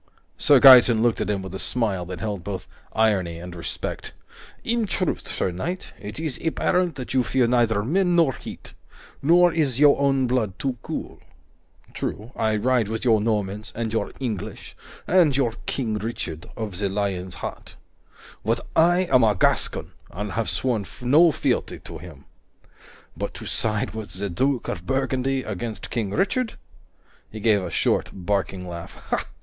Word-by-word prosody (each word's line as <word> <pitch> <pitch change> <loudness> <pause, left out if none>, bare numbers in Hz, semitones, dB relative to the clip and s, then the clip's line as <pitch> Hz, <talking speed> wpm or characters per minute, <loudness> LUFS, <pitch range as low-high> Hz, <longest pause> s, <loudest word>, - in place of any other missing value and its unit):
Sir 145 -2 +5
Gaeton 125 -4 +8
looked 120 -2 +2
at - - -1
him 100 -2 -1
with 95 -1 -8
a 95 - -5
smile 100 -8 0
that 90 -1 -6
held 100 -5 -3
both 95 0 -5 0.2
irony 100 -7 +1
and 90 +1 -8
respect. 70 -8 -5 0.5
"In 230 -1 0
truth, 185 -2 -1
sir 95 - -1
knight, 175 - -5
it 105 +6 -6
is 155 -5 -4
apparent 175 +1 +1
that 130 -2 -6
you 130 - +4
fear 125 0 +2
neither 115 -3 +2
men 175 - +2
nor 165 -6 +4
heat. - - -10 0.5
Nor 175 +3 +5
is 140 -6 0
your 145 -1 +6
own 135 -2 +2
blood 120 -6 0
too 130 -3 -3
cool. - - -6 0.7
True, 110 +4 -4
I 110 -1 +1
ride 120 0 +2
with 110 +3 -4
your 110 -3 +4
Normans 105 -1 -2
and 115 -1 -3
your 115 - -1
English 110 -5 -5 0.3
and 165 -6 +4
your 120 -5 +1
King 110 -5 -1
Richard 90 -7 -5
of 105 -5 -4
the 100 -1 0
Lion's 95 -2 -2
Heart, - - -7 0.7
but 115 +2 -1
I 175 +2 +5
am 130 -9 +4
a 105 -2 +4
Gascon, - - +1 0.2
and 105 +3 -5
have 115 -1 -1
sworn 115 -7 -1 0.2
no 155 +7 +6
fealty - - -1
to 80 - -8
him. 75 -4 -12 0.9
But - - -4
to - - -8
side 110 -2 -1
with 110 -2 -6
the 100 +1 -3
Duke 130 +7 0
of 85 - -5
Burgundy 135 0 0
against 110 +1 -5
King 110 -4 -1
Richard 210 - 0 0.4
" - - -35
He 110 - -7
gave 105 -2 +3
a 90 - -4
short, - - +1
barking 95 -1 -2
laugh. 85 -1 -8
115 Hz, 165 wpm, -24 LUFS, 100-135 Hz, 0.9 s, Gaeton